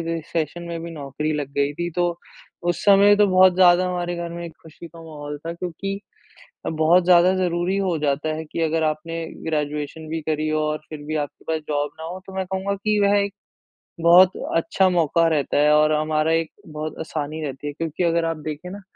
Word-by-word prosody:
Recession 165 +1 -3
में 170 -1 -5
भी 170 - -6
नौकरी 150 0 -4
लग 145 -2 -3
गई 140 0 +2
थी। 175 +3 -3
तो 175 -1 0 0.5
उस 175 - -4
समय 205 0 +6
तो 205 0 +5
बहुत 185 -1 +5
ज़्यादा 180 0 +5
हमारे 175 -1 -2
घर 170 0 -4
में 170 0 -6
खुशी 160 +1 -12
का 165 0 -13
माहौल 150 -2 -7
था। 165 - -2
क्योंकि, 185 +3 -5 0.7
बहुत 160 +3 +3
ज़्यादा 180 +1 +6
ज़रूरी 180 0 0
हो 185 -4 0
जाता 145 +1 -1
है 160 - -5
कि 155 - -5
अगर 160 0 +1
आपने 165 +2 -2 0.2
ग्रेजुएशन 150 0 -3
भी 165 +1 -2
करी 155 0 -1
और 150 0 -1
फिर 155 -2 -8
भी 155 - -2
आपके 145 -2 -4
पास 160 0 0
जॉब 145 -1 -1
ना - - -7
हो। 175 +3 -6
तो 190 - -11
मैं 190 0 -1
कहूँगा 190 +2 -2
कि 210 +1 0
वह 200 0 +4
एक 200 0 -1 0.7
बहुत 175 +2 +7 0.2
अच्छा 185 +3 +2
मौका 170 -1 +2
रहता 150 -4 0
है 150 +1 +4
और 155 0 +4
हमारा 155 +1 +1
एक 165 -1 0 0.2
बहुत 155 0 -5
आसानी 155 -1 -4
रहती 135 +1 -6
है, 145 - -4
क्योंकि 165 +3 -3
अगर 170 -1 +2
आप 165 -1 -2
देखे 155 +3 -6
ना, 200 +2 -8
165 Hz, 205 wpm, -22 LUFS, 155-180 Hz, 0.7 s, बहुत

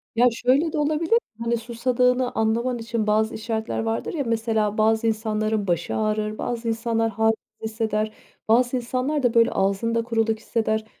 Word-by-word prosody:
Ya 240 - +5
şöyle 265 +7 +1
de - - -1
olabilir, 310 +9 +2 0.2
hani, 235 0 0
susadığını 250 +2 +1
anlaman 235 +3 0
için 230 -1 -2
bazı 220 +2 +2
işaretler 220 0 -3
vardır 225 0 -2
ya, 295 -4 -1
mesela 220 -2 0
bazı 220 +1 +3
insanların 215 -1 -1
başı 170 -1 -1
ağrır, 215 0 -1
bazı 235 -1 -3
insanlar 225 0 0
hâlsiz 220 +1 +2 0.3
hisseder, 220 -1 -1 0.4
bazı 245 +3 +3
insanlar 255 +4 -1
da 240 - +2
böyle 230 +1 +4
ağzında 225 +4 0
kuruluk 225 -1 0
hisseder. 220 -1 -1
225 Hz, 155 wpm, -24 LUFS, 220-240 Hz, 0.4 s, Ya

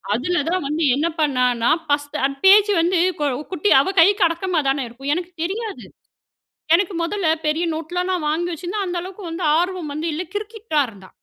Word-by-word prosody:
அதுல 350 +7 0
தான் 370 -6 -1
வந்து 310 +3 -1
என்ன 305 +4 0
பண்ணான்னா, 250 -3 +2 0.2
ஃபஸ்த்து 290 -1 -1
அந்த 275 0 -8
பேஜ் 415 +1 +7
வந்து 350 +1 +1 0.5
குட்டி 370 +4 0
அவள் 380 +5 -3
கைக்கு 400 +1 +4
அடக்கமா 340 -1 -1
தானே 270 -1 0
இருக்கும் 270 +5 -3
எனக்கு 355 0 -5
தெரியாது. 420 +2 -5 0.9
எனக்கு 380 +1 0
முதல்ல 360 0 -1 0.2
பெரிய 310 +3 0
நோட்லா 350 +3 -3
நான் 335 -5 -1
வாங்கி 345 +3 -1
வச்சுருந்தா, 365 +5 -4
அந்த 355 - -3
அளவுக்கு 380 +2 -9
வந்து 330 0 -3
ஆர்வம் 355 -3 -2
வந்து 320 +2 -3
இல்ல 330 +4 -3
கிறுக்கிட்டு 435 +1 -7
தா 295 - +5
இருந்தா. 195 -3 -15
345 Hz, 175 wpm, -21 LUFS, 295-375 Hz, 0.9 s, பேஜ்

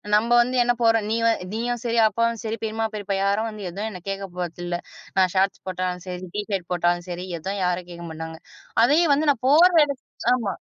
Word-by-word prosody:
நம்ம 225 +3 +2
வந்து 250 +2 -1
என்ன 245 0 +2
போற! 225 0 +6 0.2
நீ 225 - +1
வ - - +5 0.3
நீயும் 240 +1 -2
சரி, 235 -1 -1
அப்பாவும் 230 0 0
சரி, 220 0 -2
பெரிம்மா, 225 0 -1
பெரிப்பா 200 -2 -3
யாரு 200 +2 +2
வந்து 215 -2 -8
எதுவும் 205 +5 -4
எனக்குக் 185 0 -8
கேக்க 195 0 -4
போறது 175 0 -4
இல்ல. 175 - -2 0.4
நான் 185 -1 +4
ஷார்ட்ஸ் 190 +1 +1
போட்டாலும் 180 -1 -3
சரி, 180 0 -5
ட்ஷிர்ட 205 -3 -2
போட்டாலும் 175 0 +1
சரி, 180 +1 -5
எதும் 195 +4 -4
யாரும் 180 0 -1
கேக்க 170 0 -8
மாட்டாங்க. 160 0 -7 0.4
அதையும் 295 +5 +4
வந்து 300 +1 +1
நான் 255 -2 -5
போற 340 +5 +7
இடத் 280 -2 -6 0.3
ஆமா. 225 -6 -3
205 Hz, 200 wpm, -24 LUFS, 180-230 Hz, 0.4 s, போற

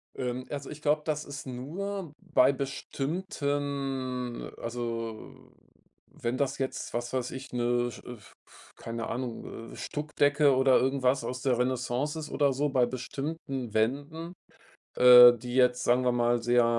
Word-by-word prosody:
Ähm, 125 0 -3
also 140 -1 -5
ich 150 0 -9
glaube, 150 0 +2
das 150 -1 -2
ist 140 +1 -8
nur 165 +7 -5
bei 155 -8 +3
bestimmten 140 -3 -3
also, 115 -1 -5 0.7
wenn 120 +2 -4
das 140 0 -1
jetzt, 135 -1 -4
was 120 +1 -3
weiß 125 -1 -2
ich, 135 +1 -8
ne, 120 0 0
sch - - -11
f 120 -4 -11
f - - -19
keine 115 0 -5
Ahnung, 115 -1 -6
äh, - - -10
Stuckdecke 145 -1 +1
oder 130 0 +5
irgendwas 135 -1 +1
aus 125 +2 -4
der 130 -3 +1
Renaissance 125 +4 -1
ist 155 -1 -6
oder 140 -2 +2
so, 145 +3 0
bei 130 -3 +3
bestimmten 135 -1 -5
Wänden, 145 +9 -1 0.6
äh, 125 -1 +10
die 120 +1 -7
jetzt, 125 -1 +3
sagen 125 +1 +2
wir 125 - +3
mal, 120 0 +2
sehr, 120 0 +4
130 Hz, 150 wpm, -29 LUFS, 120-145 Hz, 0.7 s, äh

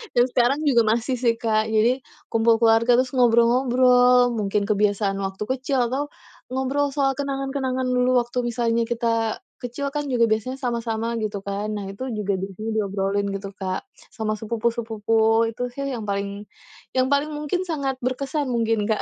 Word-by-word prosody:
Dan 240 - +5
sekarang 250 +4 +2
juga 245 -5 +5
masih 235 +3 0
sih 235 -2 +2
Kak. 220 -1 +1
Jadi, 230 +4 +2 0.3
kumpul 225 0 +4
keluarga, 230 +1 +5
terus 255 0 +1
ngobrol-ngobrol, 245 +1 +4
mungkin 210 -2 0
kebiasaan 205 -1 +1
waktu 195 +1 -3
kecil 260 -1 0
atau 285 +2 -1 0.4
ngobrol 265 +3 0
soal 275 -1 +2
kenangan-kenangan 270 -1 -2
dulu 250 0 +2
waktu 240 +1 -4
misalnya 235 -1 0
kita 230 - -1
kecil 260 +3 -4
kan 295 0 -2
juga 235 -3 +2
biasanya 220 +4 0
sama-sama 235 -2 -2
gitu 205 -2 -3
kan. 200 +1 -3
Nah 200 -2 -5
itu 260 +7 -6
juga 205 -2 -1
di 190 - -2
sini 220 +2 -4
diobrolin 200 0 0
gitu 195 0 -5
Kak, 185 -1 -3 0.3
sama 215 -1 -2
sepupu-sepupu. 225 0 +1
Itu 245 +2 -4
sih 275 0 -3
yang 225 -4 -4
paling 200 +1 -3 0.5
yang 260 +1 +2
paling 290 +2 +1
mungkin 330 +5 -2
sangat 280 -5 -2
berkesan 275 +3 -2
mungkin 225 -2 +1
Kak. 220 - 0
235 Hz, 160 wpm, -23 LUFS, 215-255 Hz, 0.5 s, Dan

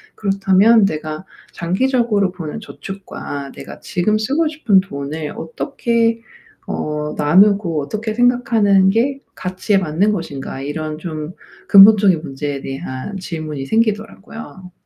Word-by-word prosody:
그렇다면 195 +2 +4
내가 155 0 -4 0.3
장기적으로 205 +1 +1
보는 180 +3 -7
저축과 165 -10 -8
내가 - - -10
지금 210 +4 0
쓰고 280 +9 0
싶은 240 -11 +3
돈을 150 -3 -6
어떻게 230 - -1 0.5
어 150 0 -3
나누고 175 +1 +3
어떻게 215 +8 -4
생각하는 225 -6 +3
게 255 +6 +1 0.2
가치에 185 +2 -1
맞는 185 +4 +1
것인가?' 140 -7 -5
이런 155 +2 -4
좀 155 0 -6 0.3
근본적인 195 -4 +7
문제에 140 -1 -4
대한 135 +7 -6
질문이 155 -6 -5
생기더라고요. 220 -3 -3
190 Hz, 285 characters per minute, -18 LUFS, 155-215 Hz, 0.5 s, 근본적인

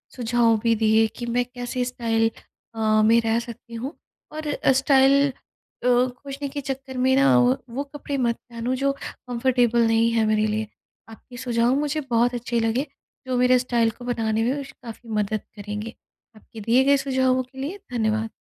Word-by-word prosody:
सुझाव 235 -2 +2
भी 230 -1 +3
दिए 220 0 +3
कि 240 - -5
मैं 245 +1 0
कैसे 245 0 -4
स्टाइल 225 -2 0 0.5
अ, 215 -1 +2
में 230 +1 +5
रह 225 0 +1
सकती 235 0 -10
हूँ। 260 +7 -5 0.4
और 310 -1 -4 0.2
स्टाइल 270 +1 +4
अ, 250 -1 -10
खोजने 255 +3 0
के 285 +1 -5
चक्कर 265 -1 -6
में 260 +1 +3
ना, 275 +1 +5
व 250 +2 +3
वो 270 +5 -3
कपड़े 285 0 -6
मत 235 -2 +1
पहनो 235 +2 -2
जो 275 +2 +1 0.4
कम्फर्टेबल 240 -1 +2
नहीं 225 +1 +3
है 225 -1 +2
मेरे 215 0 +2
लिए, 215 0 -2 0.4
आपके 245 +2 -13
सुझाव 240 0 +1
मुझे 300 +1 -1
बहुत 240 +1 +2
अच्छे 240 0 -2
लगे 230 +6 0 0.4
जो 255 -1 0
मेरे 250 0 +4
स्टाइल 240 -2 +1
को 245 +3 -12
बनाने 225 -2 0
में 275 +4 -1
काफ़ी 230 -1 -11
मदद 210 0 -1
करेंगे। 210 +2 -6 0.4
आपके 220 +1 -13
दिए 235 +5 +3
गए 280 +1 +4
सुझावों 260 -1 +1
के 260 +1 -20
लिए 325 +9 -4
धन्यवाद। 220 -2 0
245 Hz, 175 wpm, -24 LUFS, 225-260 Hz, 0.5 s, में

